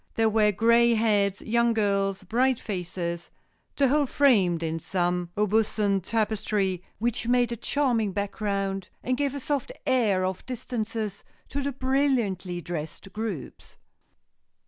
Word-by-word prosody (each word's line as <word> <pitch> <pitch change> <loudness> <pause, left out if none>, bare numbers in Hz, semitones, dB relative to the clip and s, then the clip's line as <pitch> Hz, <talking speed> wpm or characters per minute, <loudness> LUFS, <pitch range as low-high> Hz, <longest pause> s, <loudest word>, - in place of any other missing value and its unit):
There 225 -1 +3
were 215 -1 +3
gray 235 +3 +4
heads, 205 -3 +2
young 235 +1 +2
girls, 200 -3 0
bright 245 +6 +1
faces—the 180 +7 -4
whole 290 +2 +2
framed 200 - +3
in 165 0 -2
some 175 0 -1
Aubusson 210 -1 +2
tapestries 210 -2 0 0.2
which 230 0 -1
made 245 -1 +3
a - - -1
charming 235 -4 +1
background, 195 -1 -2
and 255 - 0
gave 280 0 -1
a - - -3
soft 280 0 -2
air 215 -8 +2
of 185 0 -3
distances 225 -4 -4 0.3
to 285 - -3
the 280 +1 -1
brilliantly 250 -10 0
dressed 170 +3 -6
groups." 210 - -6
215 Hz, 125 wpm, -26 LUFS, 190-240 Hz, 0.3 s, gray